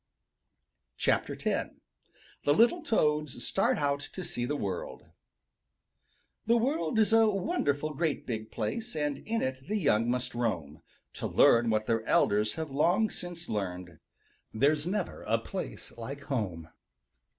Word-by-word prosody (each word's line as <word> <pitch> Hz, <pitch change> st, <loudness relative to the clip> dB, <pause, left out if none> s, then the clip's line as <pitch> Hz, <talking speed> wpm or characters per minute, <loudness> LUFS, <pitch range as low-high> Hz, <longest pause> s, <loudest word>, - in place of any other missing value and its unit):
X -, -, +2 dB
THE 145 Hz, -, -4 dB
LITTLE 240 Hz, -, +4 dB
TOADS 150 Hz, -, +1 dB
START -, -, +2 dB
OUT 145 Hz, -1 st, +1 dB
TO 180 Hz, +5 st, -7 dB
SEE 120 Hz, -7 st, -3 dB
THE 145 Hz, +4 st, -1 dB
WORLD 95 Hz, -9 st, -4 dB, 1.4 s
The 235 Hz, +1 st, +5 dB
world 260 Hz, 0 st, 0 dB
is 220 Hz, 0 st, +4 dB
a 225 Hz, -1 st, +6 dB
wonderful 155 Hz, -, 0 dB
great 155 Hz, 0 st, -1 dB
big 110 Hz, -3 st, -4 dB
place 225 Hz, -, -3 dB
And 145 Hz, -2 st, -1 dB
in 230 Hz, +1 st, -2 dB
it 130 Hz, 0 st, -4 dB
the 215 Hz, +2 st, 0 dB
young 120 Hz, -, +2 dB
must 125 Hz, 0 st, -1 dB
roam 85 Hz, -11 st, -2 dB, 0.3 s
To -, -, -3 dB
learn 115 Hz, 0 st, +5 dB
what 110 Hz, -1 st, +1 dB
their 115 Hz, 0 st, 0 dB
elders 105 Hz, +1 st, +2 dB
have 160 Hz, -3 st, -4 dB
long 180 Hz, +10 st, +2 dB
since 175 Hz, -1 st, -6 dB
learned 90 Hz, -5 st, -4 dB, 0.5 s
There's 145 Hz, +6 st, +2 dB
never 195 Hz, -1 st, -2 dB
a -, -, +3 dB
place -, -, -6 dB
like 135 Hz, +5 st, -7 dB
home. 95 Hz, -, -3 dB
145 Hz, 140 wpm, -30 LUFS, 110-180 Hz, 1.4 s, a